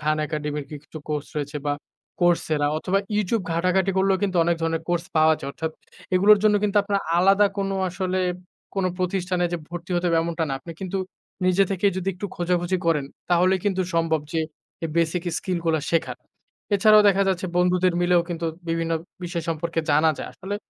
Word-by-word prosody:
খান 155 0 +1
একাডেমির 150 -1 -3
কি 150 - -5
কিছু 155 - -9
কোর্স 150 -1 -2
রয়েছে 145 +1 -4
বা 145 - +2 0.5
Coursera 160 -4 +2
অথবা 195 +4 +1 0.2
YouTube 210 -1 0
ঘাটাঘাটি 185 +3 +2
করলেও 190 0 +3
কিন্তু 190 -3 0
অনেক 170 0 +2
ধরনের 165 0 0
কোর্স 175 0 0
পাওয়া 155 0 +5
যায়। 135 - -6
অর্থাৎ 160 +2 -3 0.4
এগুলোর 205 +3 +6
জন্য 210 -1 +4
কিন্তু 210 0 0
আপনার 200 -1 0 0.2
আলাদা 195 +3 +5
কোন 195 0 0 0.2
আসলে 185 +1 -2 0.5
কোন 195 -1 0
প্রতিষ্ঠানে 180 -1 0
যে 175 - +1
ভর্তি 175 +1 -8
হতে 175 0 +1
হবে 165 -1 +3
এমনটা 165 -1 -1
না। - - -2
আপনি 170 - -8
কিন্তু 190 0 -3 0.5
নিজে 185 +2 +4
থেকেই 195 +1 +2
যদি 185 +1 -2
একটু 190 +3 -5
খোঁজাখুঁজি 175 +1 0
করেন 150 -4 +2 0.3
তাহলেই 180 +2 +3
কিন্তু 190 -2 +1
সম্ভব 165 -2 +2
যে 165 - +1 0.4
এ - - +1
বেসিক 170 +1 +1 0.2
স্কিল 180 -2 -2
গুলা 160 -2 +2
শেখার। 165 - 0 0.6
এছাড়াও 215 +1 +6
দেখা 200 0 +3
যাচ্ছে 185 0 0
বন্ধুদের 180 0 +3
মিলেও 175 0 +4
কিন্তু 165 -1 -3 0.2
বিভিন্ন 165 0 -1 0.3
বিষয় 170 -1 -3
সম্পর্কে 165 +1 -1
জানা 155 +2 +4
যায়। - - -5
আসলে 195 +2 -6
175 Hz, 185 wpm, -24 LUFS, 165-190 Hz, 0.6 s, এগুলোর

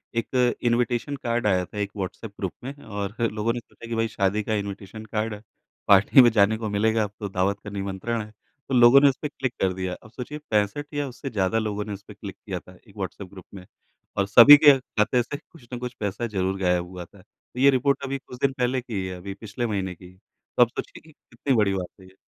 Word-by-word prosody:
एक 125 +1 +1
invitation 120 +3 0
card 120 -2 0
आया 90 -2 +2
था, 105 - -12
एक 100 -1 -2
व्हाट्सएप 100 +2 -5
ग्रुप 95 -3 -3
में 135 +2 -5
और 100 0 -5 0.2
लोगों 110 +2 -1
ने 120 - -3
सोचा 115 0 -14
कि 115 - -2
भाई 115 0 +1
शादी 105 0 0
का 110 - -2
इनविटेशन 100 +1 -5
कार्ड 110 +1 -2
है, 105 - -9 0.5
पार्टी 100 +7 +7
में 120 - +7
जाने 110 0 +3
को 110 -2 -4
मिलेगा, 110 +2 +2
अब 105 - -4
तो 100 -2 -4
दावत 95 +2 0
का 100 - -7
निमंत्रण 100 +3 -3
है। 105 0 -10 0.4
तो - - -2
लोगों 120 +3 +8
ने 140 - +7
उसपे 145 +3 -3
क्लिक 130 -4 -4
कर 95 -1 +2
दिया, 95 -1 -3
अब 110 - -15
सोचिए 130 +5 -7
65 110 +9 0
या 145 -1 -1
उससे 135 +2 -7
ज़्यादा 100 0 0
लोगों 105 -1 -3
ने 105 - -5
उसपे 100 +1 -11
क्लिक - - -9
किया - - -4
था, - - -17
एक - - -17
व्हाट्सएप 100 - -5
ग्रुप 95 -3 -12
में, 90 -2 -10 0.5
और 100 0 +1
सभी 125 +8 +10
के 140 -2 +9
खाते 120 0 0
से 145 - -6
कुछ 140 -8 -19
न - - -2
कुछ 125 0 -5
पैसा 105 +3 -2
ज़रूर 95 -2 -2
गायब 90 -1 +1
हुआ 90 -1 -8
था। 95 +2 -19
तो 125 - -15
ये 140 +1 +7
रिपोर्ट 140 +1 +1
अभी 135 0 -2
कुछ 125 - -9
दिन 140 - +2
पहले 125 +1 0
की 120 -2 -10
ही - - -4
है, 90 -1 -6
अभी 95 +2 -7
पिछले 110 +3 -5
महीने 95 -4 -3
की, 90 +2 -15 0.4
तो - - +5
आप - - +1
सोचिए - - -7
कि 155 - -18
कितनी 135 -1 -4
बड़ी 105 -3 +3
बात 95 +1 -6
है 95 - -15
ये। 95 - -20
110 Hz, 240 wpm, -25 LUFS, 100-125 Hz, 0.5 s, सभी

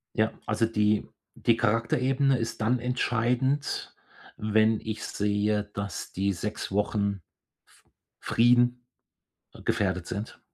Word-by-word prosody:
Ja, 110 -1 +2
also 110 +2 +1
die 105 -1 +1 0.3
die 115 - +2
Charakterebene 125 +5 +2
ist 115 -1 -3
dann 115 +3 +2
entscheidend, 125 +3 0 0.4
wenn 110 +1 +2
ich 110 0 -5
sehe, 105 +1 0
dass 100 -2 -5
die 100 +1 0
6 105 +4 -4
Wochen 100 -1 0 0.4
f - - -27 0.3
Frieden 120 +1 +3 0.8
gefährdet 95 -3 0
sind. 100 +3 -5
110 Hz, 110 wpm, -27 LUFS, 105-120 Hz, 0.8 s, Frieden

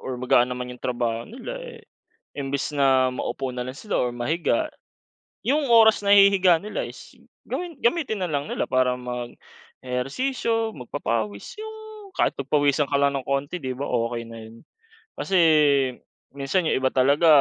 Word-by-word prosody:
or 130 -1 -4
magaan 125 0 +3
naman 125 0 -5
yung 125 - -13
trabaho 120 -2 -2
nila, 380 - -7
eh, 480 -2 -10 0.5
imbes 140 +1 -3
na 135 -2 +4
maupo 130 +1 -3
na 125 -1 -4
lang 130 - -5
sila 210 +8 -3
or 125 -1 0
mahiga. 165 - 0 0.8
Yung 285 +1 +1
oras 225 -2 +6
na 200 0 +4
ihihiga 195 -3 +6
nila 210 - -4
is - - -12 0.3
gawin 345 -3 -5
gamitin 235 - +1
na 175 - -3
lang 145 0 -2
nila - - -1
para 130 -1 +1
mag-ehersisyo, 130 - -4
magpapawis, 115 - -4
yung 440 0 -7 0.4
kahit - - +2
pagpawisan 145 +1 +2
ka 140 - +1
lang 140 0 +2
ng - - -15
konti, 140 +5 -2
'di 130 -2 -4
ba, 140 - -3
okey 115 -1 -1
na 115 0 -10
'yon? 110 +1 -13 0.5
Kasi 195 - 0 1.0
minsan 155 +5 0
yung - - +2
iba 130 0 +1
talaga 140 +5 +3
140 Hz, 160 wpm, -24 LUFS, 125-200 Hz, 1.0 s, oras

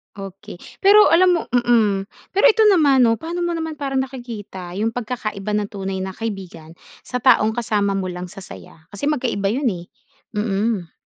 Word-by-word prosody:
Okey. 195 -1 -10 0.2
Pero 415 +2 +6
alam 360 +2 +5
mo 335 - +1
mm. 230 -5 +2 0.2
Pero 400 +4 +2
ito 455 -2 +5
naman 290 -9 +4
'no, 230 -2 +4
paano 335 +5 -5
mo 345 - 0
naman 320 -1 -4
parang 275 -2 -3
nakikita 235 -8 -6
yung 225 +2 -1
pagkakaiba 215 -4 -4
ng 210 - -1
tunay 195 -1 -4
na 190 - -6
kaibigan 185 -7 -7 0.2
sa 250 - -4
taong 245 -3 +4
kasama 210 -3 -1
mo 190 - -2
lang 180 0 -6
sa - - -16
saya? 185 -4 -12
Kasi 285 +9 -2
magkaiba 240 -9 -1
'yon 265 +7 -1
eh. 175 -1 -8 0.5
Mm. 210 -3 -1
220 Hz, 175 wpm, -20 LUFS, 195-270 Hz, 0.5 s, Pero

